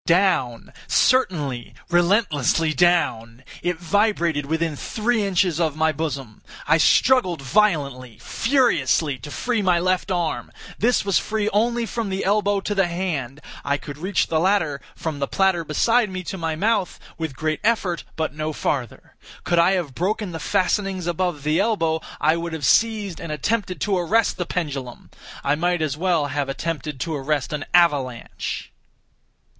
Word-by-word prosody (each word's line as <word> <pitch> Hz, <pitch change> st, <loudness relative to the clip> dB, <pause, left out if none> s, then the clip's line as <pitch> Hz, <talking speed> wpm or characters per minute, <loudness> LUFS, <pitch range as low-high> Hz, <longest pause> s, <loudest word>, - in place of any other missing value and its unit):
Down—certainly, 155 Hz, -, +1 dB, 0.2 s
relentlessly 170 Hz, -, +2 dB
down! 130 Hz, -10 st, +1 dB, 0.2 s
It 175 Hz, -1 st, -1 dB
vibrated 170 Hz, -5 st, +1 dB
within 160 Hz, 0 st, -1 dB
three 220 Hz, -, -1 dB
inches 180 Hz, -4 st, +1 dB
of 160 Hz, -4 st, 0 dB
my 160 Hz, 0 st, +2 dB
bosom! 140 Hz, -7 st, -5 dB, 0.3 s
I 160 Hz, +2 st, +4 dB
struggled 210 Hz, -, +4 dB
violently, 140 Hz, -, 0 dB
furiously, 160 Hz, -, +1 dB
to 145 Hz, -, -9 dB
free 235 Hz, +8 st, -1 dB
my 180 Hz, -3 st, +3 dB
left 185 Hz, +3 st, 0 dB
arm. 175 Hz, -3 st, -2 dB, 0.3 s
This 235 Hz, -1 st, +2 dB
was 195 Hz, -3 st, +3 dB
free 215 Hz, -1 st, -1 dB
only 235 Hz, +3 st, +1 dB
from 230 Hz, -2 st, -3 dB
the 190 Hz, 0 st, -2 dB
elbow 205 Hz, 0 st, +2 dB
to 205 Hz, -, -2 dB
the 195 Hz, -3 st, +2 dB
hand. 155 Hz, -7 st, -3 dB, 0.2 s
I 140 Hz, 0 st, 0 dB
could 145 Hz, +1 st, -9 dB
reach 185 Hz, +3 st, 0 dB
the 160 Hz, -, 0 dB
latter, 170 Hz, -6 st, +1 dB
from 155 Hz, -3 st, -4 dB
the 140 Hz, -, -1 dB
platter 190 Hz, -3 st, +1 dB
beside 225 Hz, +9 st, +2 dB
me, 185 Hz, -1 st, -5 dB
to 185 Hz, -, -5 dB
my 160 Hz, -1 st, -2 dB
mouth, 205 Hz, +1 st, 0 dB, 0.2 s
with 160 Hz, -4 st, -4 dB
great 155 Hz, +2 st, -2 dB
effort, 205 Hz, -6 st, +1 dB
but 160 Hz, -2 st, -2 dB
no 155 Hz, +1 st, -3 dB
farther. 130 Hz, -5 st, -3 dB, 0.3 s
Could 175 Hz, -1 st, +2 dB
I 175 Hz, +3 st, +5 dB
have 170 Hz, -8 st, -2 dB
broken 195 Hz, -, -2 dB
the 165 Hz, -, -5 dB
fastenings 185 Hz, +2 st, 0 dB
above 175 Hz, -3 st, -1 dB
the 155 Hz, +3 st, +1 dB
elbow, 165 Hz, -7 st, +1 dB, 0.2 s
I 155 Hz, +3 st, +3 dB
would 170 Hz, 0 st, -4 dB
have 155 Hz, -4 st, -3 dB
seized 215 Hz, -, +2 dB
and 165 Hz, -, -5 dB
attempted 185 Hz, +4 st, -1 dB
to 195 Hz, -3 st, +1 dB
arrest 215 Hz, +7 st, +1 dB
the 180 Hz, -, -3 dB
pendulum. 140 Hz, -8 st, -5 dB, 0.3 s
I 140 Hz, -, +2 dB
might 175 Hz, +2 st, 0 dB
as 145 Hz, -3 st, -1 dB
well 170 Hz, -2 st, +1 dB
have 145 Hz, -1 st, -2 dB
attempted 150 Hz, -1 st, -4 dB
to 160 Hz, -2 st, -2 dB
arrest 145 Hz, 0 st, -2 dB
an 150 Hz, -1 st, -3 dB
avalanche! 145 Hz, -9 st, 0 dB
170 Hz, 160 wpm, -22 LUFS, 150-195 Hz, 0.3 s, I